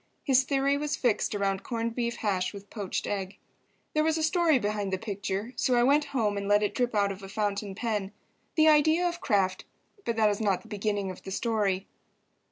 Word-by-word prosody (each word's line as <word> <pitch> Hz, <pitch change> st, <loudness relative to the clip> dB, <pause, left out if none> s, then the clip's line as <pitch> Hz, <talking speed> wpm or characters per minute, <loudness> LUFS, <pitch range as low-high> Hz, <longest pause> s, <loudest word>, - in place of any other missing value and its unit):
His 265 Hz, -1 st, +4 dB
theory 275 Hz, +1 st, +1 dB
was 295 Hz, 0 st, -1 dB
fixed 230 Hz, -3 st, 0 dB
around 195 Hz, -1 st, 0 dB
corned 230 Hz, -1 st, -3 dB
beef 235 Hz, -1 st, -2 dB
hash 195 Hz, -2 st, -1 dB
with 200 Hz, 0 st, -11 dB
poached 205 Hz, -4 st, -3 dB
egg. 195 Hz, -1 st, -3 dB, 0.6 s
There 305 Hz, -, +2 dB
was 320 Hz, 0 st, +2 dB
a 320 Hz, -, -1 dB
story 320 Hz, -2 st, +3 dB
behind 205 Hz, -3 st, -2 dB
the 190 Hz, -, 0 dB
picture, 200 Hz, +2 st, -4 dB
so 250 Hz, +1 st, +2 dB
I 240 Hz, -, +4 dB
went 290 Hz, +4 st, +4 dB
home 215 Hz, -6 st, 0 dB
and 200 Hz, 0 st, -3 dB
let 205 Hz, +1 st, +4 dB
it 205 Hz, 0 st, 0 dB
drip 245 Hz, -1 st, 0 dB
out 200 Hz, -1 st, +2 dB
of 195 Hz, 0 st, -8 dB
a 195 Hz, -, -9 dB
fountain 205 Hz, -1 st, -2 dB
pen. 210 Hz, -3 st, -2 dB, 0.4 s
The 315 Hz, -1 st, +5 dB
idea 315 Hz, +3 st, +5 dB
of 345 Hz, 0 st, -4 dB
Kraft—but 205 Hz, -, -2 dB
that 220 Hz, -1 st, +4 dB
is 205 Hz, -, -3 dB
not 200 Hz, -4 st, +1 dB
the -, -, -15 dB
beginning 205 Hz, -2 st, -2 dB
of 185 Hz, -, -11 dB
the -, -, -8 dB
story. 200 Hz, -2 st, 0 dB
215 Hz, 205 wpm, -28 LUFS, 200-265 Hz, 0.6 s, The